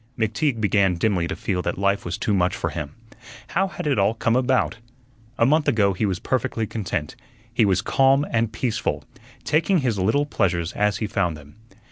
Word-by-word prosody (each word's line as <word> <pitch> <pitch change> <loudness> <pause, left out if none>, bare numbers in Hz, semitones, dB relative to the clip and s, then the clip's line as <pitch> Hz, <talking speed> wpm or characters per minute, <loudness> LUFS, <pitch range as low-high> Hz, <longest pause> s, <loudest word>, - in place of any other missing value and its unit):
McTeague 115 +4 0
began 100 -3 +2
dimly 90 -1 0
to - - -4
feel 90 -3 -2
that - - -3
life 100 +1 +1
was 85 +3 -3
too 110 - -1
much 90 -1 +1
for - - -3
him. 75 0 -6 0.5
How 190 +2 +1
had 190 - -7
it 140 -7 +1
all 100 +3 +2
come 115 0 +1
about? 130 -1 +1 0.6
A 115 - +4
month 150 +4 +2
ago 100 -4 +3
he 105 +3 0
was 95 -2 -1
perfectly 115 0 -1
content; 100 -8 -4 0.4
he 115 -2 +3
was 95 -2 +1
calm 135 +2 +3
and 115 -1 +1
peaceful, 115 +1 -2 0.4
taking 165 +6 +2
his 120 -6 0
little 110 +10 +2
pleasures 85 - -1
as 105 -1 +1
he 110 - -2
found 90 -6 -1
them. 75 -1 -15
105 Hz, 190 wpm, -23 LUFS, 95-125 Hz, 0.6 s, A